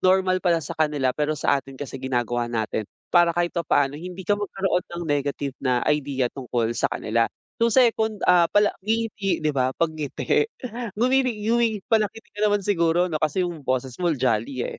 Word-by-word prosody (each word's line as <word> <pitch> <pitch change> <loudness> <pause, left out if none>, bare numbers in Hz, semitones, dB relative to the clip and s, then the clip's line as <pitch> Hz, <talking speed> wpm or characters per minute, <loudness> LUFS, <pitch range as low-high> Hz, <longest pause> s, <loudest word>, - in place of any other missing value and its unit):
normal 185 0 +3
pala 175 -3 +3
sa 155 - -5
kanila 150 -5 +1
pero 150 +1 -1
sa 140 -1 +2
atin 135 0 -13
kasi 145 - -7
ginagawa 120 -2 -1
natin, 110 -2 -2 0.2
para 175 -1 +6
kahit 175 0 +1
papaano 145 -4 +1
hindi 180 +4 -7
ka 205 - +3
magkaroon 195 -3 0
ng 170 0 -6
negative 140 -1 -1
na 125 -2 +1
idea 140 -3 +1
tungkol 120 -3 -2
sa - - 0
kanila. 115 +1 0 0.3
So 230 - +4
second, 220 -3 +2
ah, 175 -1 +5
pala 205 0 +3
ngingiti 210 -5 -1
'di 155 - +3
ba, 130 -2 +1
'pag 165 -1 +1
ngiti. 155 - 0 0.5
Ngumingi 255 +2 +2 0.2
ngumingi 230 -2 +2
pala-ngiti 220 0 +1
ka 205 - -8
naman 205 -1 +1
siguro 175 -3 +2
'no, 155 - -1
kasi 155 +5 +1
yung 170 -3 -5
boses 130 -1 -1
mo 175 - +2
jolly, 125 0 0
eh. - - -6
165 Hz, 185 wpm, -24 LUFS, 135-195 Hz, 0.5 s, para